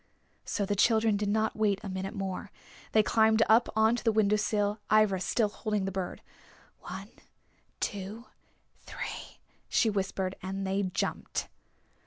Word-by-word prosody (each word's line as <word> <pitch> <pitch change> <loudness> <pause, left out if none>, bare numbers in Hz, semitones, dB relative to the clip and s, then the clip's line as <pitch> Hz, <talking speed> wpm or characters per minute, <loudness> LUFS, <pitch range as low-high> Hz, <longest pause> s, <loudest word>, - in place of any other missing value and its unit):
So 205 - -1
the 205 +1 -1
children 220 +1 +4
did 205 0 -1
not 220 +1 +1
wait 210 -3 +1
a - - -5
minute 190 +2 -4
more. 195 -2 -4 0.4
They 215 - +5
climbed 220 0 +4
up 225 +2 +5
onto 220 +2 +3
the 225 - +3
window 210 -1 +3
sill, 210 0 0
Ivra 215 -3 +4
still 210 +4 +1
holding 210 -2 -2
the 195 - -2
bird. 190 -1 -4 0.6
"One, - - -8 0.7
two, 205 +3 -4 0.5
three," - - -7 0.3
she 225 - +3
whispered, 190 -1 -2
and 195 +1 -4
they 195 +1 0
jumped. 185 -2 -2
205 Hz, 145 wpm, -30 LUFS, 195-220 Hz, 0.7 s, They